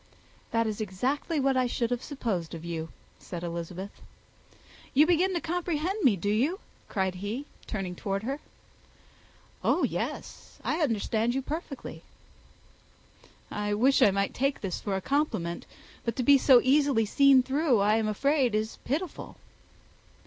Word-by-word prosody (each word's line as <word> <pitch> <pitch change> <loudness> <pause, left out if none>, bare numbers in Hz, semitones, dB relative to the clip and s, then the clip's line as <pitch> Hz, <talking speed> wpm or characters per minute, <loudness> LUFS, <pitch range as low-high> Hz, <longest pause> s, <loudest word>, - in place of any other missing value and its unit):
"That 230 0 +1
is 215 0 -3
exactly 260 - -1
what 270 -1 +2
I 255 -1 +2
should 240 0 -1
have 245 0 -1
supposed 210 - -3
of 165 0 -8
you," 165 -1 -4 0.3
said 175 -1 -7
Elizabeth. 170 +3 -6 0.9
"You 295 +3 +7
begin 355 +3 +3
to - - +1
comprehend 350 +3 -2
me, 245 -7 +5
do 205 +3 -1
you?" 280 - +1 0.3
cried 190 -3 0
he, 205 +9 -4 0.2
turning 195 -4 -3
towards 195 +3 -3
her. 275 +3 -2 1.2
"Oh - - +2
yes - - -4
I 310 - 0
understand 230 -2 +1
you 270 - -1
perfectly." 300 -1 -6 1.5
"I 210 0 -1
wish 260 +6 +4
I - - +7
might 200 0 0
take 275 +2 0
this 190 -4 -3
for 200 -2 -2
a 190 - -2
compliment; 185 - -1 0.4
but 230 -2 -2
to 255 - -1
be 280 +2 +6
so 255 -2 +7
easily 270 -4 +3
seen 270 +4 +5
through, 275 -1 +2
I 210 +2 +3
am 220 -1 0
afraid, 260 +2 +2
is 215 +1 -2
pitiful." 325 +7 -3
240 Hz, 150 wpm, -28 LUFS, 200-280 Hz, 1.5 s, You